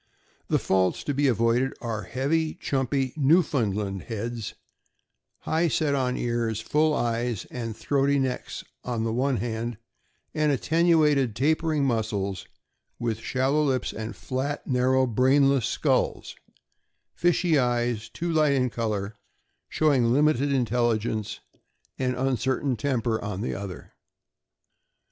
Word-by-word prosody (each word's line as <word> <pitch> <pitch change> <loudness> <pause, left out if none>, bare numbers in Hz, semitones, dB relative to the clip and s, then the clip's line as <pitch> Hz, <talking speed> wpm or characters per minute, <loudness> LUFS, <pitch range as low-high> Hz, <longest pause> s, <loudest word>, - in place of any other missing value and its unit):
The - - +2
faults 95 -1 +1
to 145 - -2
be 140 +1 +2
avoided 120 +2 +2
are 115 -3 -3
heavy, 150 +8 -1
chumpy, 135 -4 -1
"Newfound 140 - +2
land" 100 -2 -3
heads, 115 0 -5 0.9
high 165 +2 +1
set 155 -2 +1
on 130 -2 0
ears, 115 -2 -1
full 150 +6 +1
eyes, 120 -3 -1
and 115 -3 -5
throaty 140 0 +1
necks 130 -2 -3 0.2
on 120 -2 -2
the 115 -1 -1
one 130 +2 +1
hand, 115 +1 -3 0.6
and 150 -1 +2
attenuated, 150 -4 +3
tapering 155 +2 +1
muzzles, 110 -6 -2 0.5
with 115 -2 -2
shallow 130 +5 +1
lips, 130 -4 0
and 110 +1 -6
flat, 140 +3 -3
narrow, 130 0 +2
brainless 130 +1 +3
skulls, - - 0 0.8
fishy 175 -3 +2
eyes 120 -3 0
too 170 0 -3
light 155 -3 +3
in 125 -3 +1
color, 110 -4 -2
and 105 - -9 0.6
showing 145 -6 +2
a - - +3
limited 145 +2 +3
intelligence 115 -4 0 0.6
and 125 -1 0
uncertain 130 +1 0
temper 115 -3 -1
on 100 -1 -4
the 120 - -2
other. 100 -3 -7
125 Hz, 125 wpm, -26 LUFS, 115-140 Hz, 0.9 s, attenuated